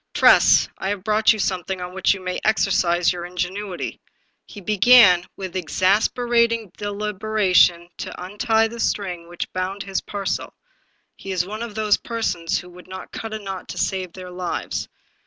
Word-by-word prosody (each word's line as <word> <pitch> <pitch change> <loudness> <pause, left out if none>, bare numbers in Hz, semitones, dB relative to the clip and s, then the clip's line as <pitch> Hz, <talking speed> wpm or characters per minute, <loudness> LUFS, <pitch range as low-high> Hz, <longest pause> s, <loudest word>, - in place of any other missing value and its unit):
"Tress, - - +6
I 190 - -2
have 200 -2 -3
brought 215 +1 +4
you 220 - 0
something 190 -2 -2
on 180 0 -6
which 190 0 +2
you 190 - -9
may 185 0 -3
exercise 180 -5 +2
your 175 -1 -6
ingenuity." 180 +2 -4 0.5
He 205 - -10
began, 200 -2 +6
with 190 -2 -6
exasperat 220 +7 +2
ing 225 -5 -4
deliberation, 205 -4 +1
to - - -7
untie 220 +4 +1
the 235 +1 -9
string 180 -6 -2
which 175 - -6
bound 185 +2 -3
his 195 -1 -2
par 200 -1 -6
cel; - - -3 0.6
he 195 - -8
is 180 -2 0
one 215 +3 -6
of 235 -3 -6
those 215 -1 +2
persons 200 -8 -2
who 180 - -8
would 180 +1 -14
not 185 0 -9
cut 225 - -6
a 220 - -3
knot 195 -3 -7
to - - -6
save 185 -2 -2
their 185 -1 -9
lives. 180 -1 -4
190 Hz, 175 wpm, -22 LUFS, 180-215 Hz, 0.6 s, Tress